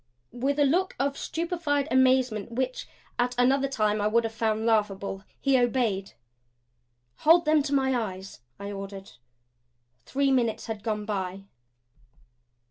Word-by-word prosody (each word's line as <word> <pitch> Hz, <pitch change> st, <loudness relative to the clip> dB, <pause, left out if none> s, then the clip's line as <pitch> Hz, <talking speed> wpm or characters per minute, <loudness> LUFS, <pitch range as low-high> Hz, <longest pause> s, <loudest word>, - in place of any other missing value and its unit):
With 270 Hz, +4 st, -1 dB
a 290 Hz, -, +4 dB
look 360 Hz, +7 st, +1 dB
of 275 Hz, +1 st, 0 dB
stupefied 325 Hz, -5 st, -2 dB
amazement 255 Hz, -4 st, +2 dB
which, 380 Hz, -, -3 dB, 0.3 s
at 245 Hz, 0 st, +1 dB
another 265 Hz, +2 st, +3 dB
time 215 Hz, -5 st, 0 dB
I 205 Hz, -, +2 dB
would 230 Hz, +2 st, +3 dB
have 225 Hz, 0 st, -3 dB
found 220 Hz, -1 st, -1 dB
laughable, 200 Hz, -3 st, 0 dB, 0.2 s
he 270 Hz, -2 st, +3 dB
obeyed. 230 Hz, -6 st, 0 dB, 1.0 s
"Hold 335 Hz, +2 st, +5 dB
them 305 Hz, 0 st, +4 dB
to 285 Hz, 0 st, -3 dB
my 265 Hz, -1 st, +2 dB
eyes," 195 Hz, -, -5 dB, 0.2 s
I 200 Hz, 0 st, -5 dB
ordered. 195 Hz, -1 st, -8 dB, 1.0 s
Three 275 Hz, 0 st, +1 dB
minutes 235 Hz, -4 st, +1 dB
had 220 Hz, -2 st, -5 dB
gone 210 Hz, -1 st, -2 dB
by. 195 Hz, -2 st, -3 dB
245 Hz, 135 wpm, -27 LUFS, 210-275 Hz, 1.0 s, Hold